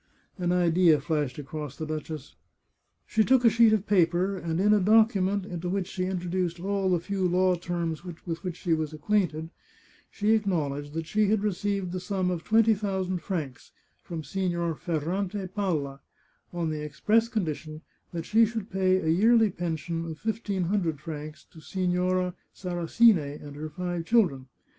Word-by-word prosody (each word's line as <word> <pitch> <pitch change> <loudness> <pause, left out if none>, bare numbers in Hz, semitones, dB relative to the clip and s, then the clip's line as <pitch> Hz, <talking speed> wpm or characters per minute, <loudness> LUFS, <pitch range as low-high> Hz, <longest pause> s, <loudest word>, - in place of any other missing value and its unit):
" - - -40
An 175 - +2
idea 175 -3 +4
flashed 145 -3 -2
across 150 -1 -6
the 155 - -4
duchess. 155 -2 -6 0.7
She 220 - +2
took 255 +1 +3
a 230 - +7
sheet 230 0 +5
of 215 -2 +1
paper, 185 0 +2
and 170 -2 -3
in 210 +2 +4
a 210 - +5
document 205 -2 +3
into 175 -2 -4
which 190 0 -1
she 185 0 -3
introduced 180 -1 -2
all 195 +1 0
the 180 -2 +2
few 190 +1 -1
law 185 +1 +3
terms 170 -2 -3
with 175 -3 -8 0.3
which 180 -3 -3
she 175 -3 0
was 155 -1 -1
acquainted, 160 -1 0 0.6
she 210 +1 0
ac 220 -2 +3
knowledged 145 -4 -2
that 165 0 -3
she 210 +5 +1
had 210 0 +1
received 200 -2 -1
the 185 - -3
sum 185 -1 -1
of 170 -2 -3
twenty 225 0 +4
thou 195 -2 -2
sand 185 -1 -3
francs 155 -8 -5 0.3
from 165 -2 -6
Signor 175 -2 -1
Ferrante 180 +5 -2
Palla, 170 -8 -2 0.5
on 170 -2 -2
the 150 -1 -4
express 210 +10 +2
con 220 -5 -1
dition 155 0 -6 0.3
that 165 -2 -4
she 225 +2 +4
should 225 -1 -2
pay 185 -1 +2
a 170 - -3
yearly 220 +6 +4
pension 165 -1 -3
of 160 - -6
fifteen 210 -3 -2
hundred 170 -5 0
francs 155 -1 -7
to 160 - -14
Signora 180 0 0 0.2
Sarasine 175 -3 +2
and 145 -1 -10
her 155 +1 -5
five 175 +1 -4
children. 170 - +2
180 Hz, 175 wpm, -27 LUFS, 160-200 Hz, 0.7 s, a